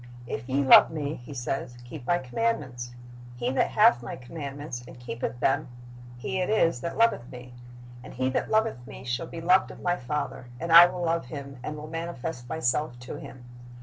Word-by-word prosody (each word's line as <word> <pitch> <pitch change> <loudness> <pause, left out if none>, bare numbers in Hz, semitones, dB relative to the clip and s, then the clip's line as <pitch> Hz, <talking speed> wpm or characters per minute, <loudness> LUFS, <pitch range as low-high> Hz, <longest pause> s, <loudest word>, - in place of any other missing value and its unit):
"If 120 +1 -5
ye 140 +2 +2
love 130 - +9
Me," 150 -2 -3
He 125 -1 -10
says, 125 0 -3
"keep 125 +1 -9
My 175 - +3
.commandments. 130 - -2 0.4
He 120 +1 -1
that 130 - +2
hath 215 - +5
My 120 - -6
commandments, 140 -1 -7
and 125 - -12
keepeth 120 0 -4
them, 135 - +1 0.5
he 190 +10 -3
it 180 - -1
is 165 - +2
that 170 - -4
loveth 230 - +2
Me. 125 0 -10 0.5
And - - -11
he 130 +1 0
that - - -1
loveth 220 - +1
Me - - -10
shall 125 +6 -2
be 165 - -7
loved 180 +3 +4
of - - -11
My 175 0 +1
Father, 140 -1 -4
and 170 +2 -3
I 170 +1 +11
will 180 0 -4
love 165 -3 0
him, 140 -1 -8
and 150 +4 -5
will 150 - -7
manifest 165 -5 -5
Myself 135 -3 0
to 125 - -7
him. 125 -2 -11
140 Hz, 195 wpm, -27 LUFS, 125-165 Hz, 0.5 s, I